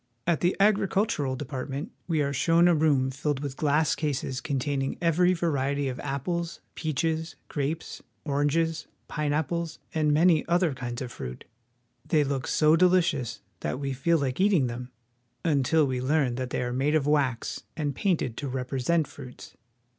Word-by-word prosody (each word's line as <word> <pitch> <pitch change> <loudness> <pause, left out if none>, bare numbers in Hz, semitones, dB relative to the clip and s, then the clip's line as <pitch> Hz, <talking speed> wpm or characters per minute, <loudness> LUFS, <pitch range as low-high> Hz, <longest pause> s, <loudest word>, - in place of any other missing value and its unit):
At 170 -3 +1
the 175 +1 +2
Agricultural 195 -8 +2
Department 140 - -5 0.2
we 160 -4 +1
are 140 0 -1
shown 165 +5 +4
a 175 - +5
room 145 -4 +2
filled 145 +1 -2
with 140 -2 -4
glass 150 +1 +2
cases 135 -3 -2
containing 135 0 -1
every 175 +1 +3
variety 140 -4 0
of 125 - -5
apples, 165 +5 -3
peaches, 160 +1 -2
grapes, 150 +3 -3 0.2
oranges, 155 +3 0 0.2
pineapples, 155 +2 -1 0.2
and 155 -2 +2
many 160 +1 +4
other 175 -2 +2
kinds 120 -1 -5
of 125 - -7
fruit. 65 - -7 0.6
They 150 +1 +2
look 135 -2 -2
so 155 0 +4
deHcious 170 -8 +2 0.2
that 75 - -3
we 140 -1 -2
feel 165 +6 +2
like 135 -2 -2
eating 190 -9 +4
them 125 +1 -5 0.6
until 150 0 +3
we 130 -2 -2
learn 135 -1 +2
that 130 +1 -3
they - - -1
are 125 0 -2
made 140 +4 +1
of 150 -3 +2
wax 140 -5 0 0.2
and 145 -2 -1
painted 160 - 0
to 145 - -3
represent 135 +5 0
fruits. 130 -3 -11
145 Hz, 155 wpm, -27 LUFS, 130-165 Hz, 0.6 s, a